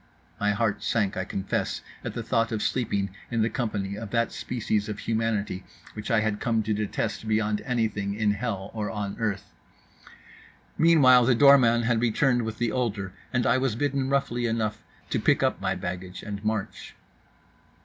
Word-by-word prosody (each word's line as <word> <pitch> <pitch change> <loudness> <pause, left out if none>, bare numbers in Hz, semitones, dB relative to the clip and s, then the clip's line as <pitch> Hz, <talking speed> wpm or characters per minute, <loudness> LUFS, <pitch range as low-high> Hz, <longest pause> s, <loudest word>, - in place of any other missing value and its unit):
My 105 0 +2
heart 105 -1 0
sank, 105 -4 0
I 95 - -2
confess, 95 0 -2 0.2
at - - -5
the - - -3
thought 115 +1 +1
of 110 -2 -1
sleeping 100 -6 -1 0.2
in 115 -2 +1
the 110 - 0
company 105 -5 -2
of 105 0 -6
that 115 +2 +1
species 110 -3 -2
of 105 - -4
humanity 110 -4 -1 0.3
which 105 0 -6
I 115 -2 +3
had 105 -1 -1
come 115 -2 +1
to 110 +1 0
detest 105 +1 -2
beyond 105 -1 +1
anything 110 -5 -1
in 105 -1 +2
hell 105 -2 -3
or 105 -2 -3
on 105 -2 -4
earth. 105 -4 -2 1.2
Meanwhile 135 -7 +6
the 125 0 +4
doorman 120 -3 +6
had 115 -1 +1
returned 120 +2 +2
with 110 -1 -4
the 120 -2 0
older, 105 -7 -2 0.2
and 125 -2 +1
I 130 - +3
was 130 -4 0
bidden 135 0 0
roughly 120 -3 0
enough 110 -2 -1 0.3
to - - +1
pick - - +3
up - - +1
my - - 0
baggage 90 +1 -6
and 100 -1 -6
march. 110 -2 -3
110 Hz, 175 wpm, -26 LUFS, 105-120 Hz, 1.2 s, Meanwhile